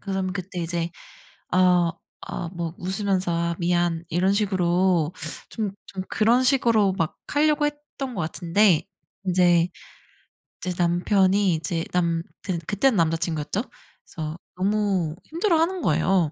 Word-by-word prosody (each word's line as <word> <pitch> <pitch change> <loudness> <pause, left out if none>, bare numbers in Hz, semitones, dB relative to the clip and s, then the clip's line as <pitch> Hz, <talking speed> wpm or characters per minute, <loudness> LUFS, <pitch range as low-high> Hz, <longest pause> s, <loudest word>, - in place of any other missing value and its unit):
그럼 190 -2 -2
그때 185 -2 -6
이제 170 0 -2 0.6
아 180 -2 +4 0.4
아 170 - -4
뭐 170 -1 -4
웃으면서 190 -1 -1
"아 170 0 0
미안." 175 -1 +1
이런 180 +4 +2
식으로 180 -4 +2 0.4
좀 210 -3 -3
좀 190 -1 -5
그런 235 +4 +3
식으로 230 -7 +3
막 165 -2 -1
하려고 295 0 +2
했던 290 -3 -6
것 190 - -3
같은데 175 +2 +2 0.4
인제 175 -2 +4 1.0
인제 180 -1 -2
남편이 190 +2 +3
이제 165 +1 -2
남 170 -2 +1 0.2
그 185 -3 -2
그때는 215 +3 +2
남자 165 -1 +2
친구였죠. 160 +3 -2 0.4
그래서 155 -2 -6 0.2
너무 190 -4 0
힘들어하는 340 +1 +1
거예요. 180 -5 +2
185 Hz, 260 characters per minute, -24 LUFS, 170-205 Hz, 1.0 s, 아